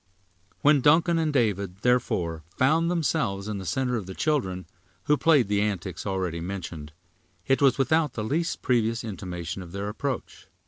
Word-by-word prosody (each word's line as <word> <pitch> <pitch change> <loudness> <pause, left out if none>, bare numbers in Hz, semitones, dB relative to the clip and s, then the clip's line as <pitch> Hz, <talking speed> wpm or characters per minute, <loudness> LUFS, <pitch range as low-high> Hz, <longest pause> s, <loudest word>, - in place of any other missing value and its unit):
When 145 -1 +5
Duncan 165 +4 +4
and 160 -2 +1
David, 100 -7 0
therefore, 85 -10 +1
found 160 +6 +3
themselves 145 - 0
in 105 -2 -3
the 95 - -7
center 125 +6 0
of 100 -5 -6
the 95 - -7
children, 95 -13 -1 0.4
who 150 - +3
played 145 -6 +4
the 100 0 +1
antics 95 -4 -3
already 95 -4 -2
mentioned, 85 -4 -6 0.5
it 135 +1 +2
was 135 -3 +4
without 150 +2 +2
the 110 - -3
least 160 +9 -1
previous 115 -1 +1
intimation 90 -4 -5
of 85 -1 -10
their 100 +1 -3
approach. 130 +4 -5
110 Hz, 165 wpm, -26 LUFS, 95-145 Hz, 0.5 s, When